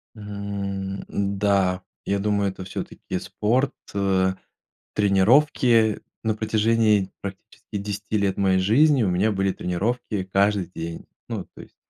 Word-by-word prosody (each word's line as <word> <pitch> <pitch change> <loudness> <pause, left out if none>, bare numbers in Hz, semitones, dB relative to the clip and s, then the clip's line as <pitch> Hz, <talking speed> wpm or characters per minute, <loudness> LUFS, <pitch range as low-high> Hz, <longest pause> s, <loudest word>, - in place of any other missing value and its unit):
Мгм, 100 -2 -4
да, 100 -2 +1 0.2
я 100 0 0
думаю, 100 -1 +1
это 95 - -8
всё-таки 95 - -5
спорт, 125 +6 0 0.2
э, 95 -1 +2 0.6
тренировки. 110 +2 +4 0.2
На 110 -1 +1
протяжении 110 -2 +2
практически 100 +1 -8
10 105 +1 -3
лет 100 -2 0
моей 95 -1 +3
жизни 130 +7 +4
у 95 - +2
меня 95 +5 +2
были 95 -1 +1
тренировки 105 +3 -2
каждый 100 -2 +2
день. 80 0 -6 0.2
Ну, - - -4
то - - -10
есть, - - -16
100 Hz, 125 wpm, -24 LUFS, 95-110 Hz, 0.6 s, тренировки